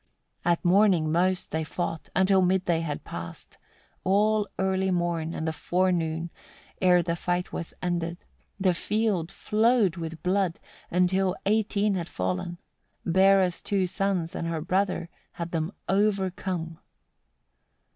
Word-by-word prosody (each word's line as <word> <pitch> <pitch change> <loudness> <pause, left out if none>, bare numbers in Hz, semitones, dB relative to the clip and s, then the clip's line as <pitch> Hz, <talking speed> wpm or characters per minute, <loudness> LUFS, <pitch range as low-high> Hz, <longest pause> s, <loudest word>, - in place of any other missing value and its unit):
50. - - -1
At 170 - -5
morning 180 -4 +4
most 180 +2 +1
they 160 0 -1
fought, 165 +1 -4
until 190 0 +4
mid 185 +1 +2
day 170 -2 +2
had 150 -3 -4
passed; 85 0 -9 0.4
all 210 +2 +2
early 190 0 +1
morn, 170 -2 -1
and 160 - -3
the 160 - 0
forenoon, 170 -2 0 0.5
ere 180 -2 +5
the 170 -1 -1
fight 180 +1 -2
was 170 - -5
ended, 170 -1 -1 0.4
the 190 -2 +3
field 200 -2 0
flowed 215 -3 +2
with 165 -1 -6
blood, 185 -2 +1 0.3
until 185 +1 +2
eighteen 210 0 +2
had 175 -3 -2
fallen: 95 - -3 0.5
Bera's 190 0 +4
two 195 -2 0
sons, 185 -2 -1
and 165 - -3
her 165 -1 -2
brother, 185 +1 0 0.3
had 170 0 -5
them 165 +1 -1 0.2
overcome. 190 -4 0
180 Hz, 135 wpm, -27 LUFS, 165-195 Hz, 0.5 s, ere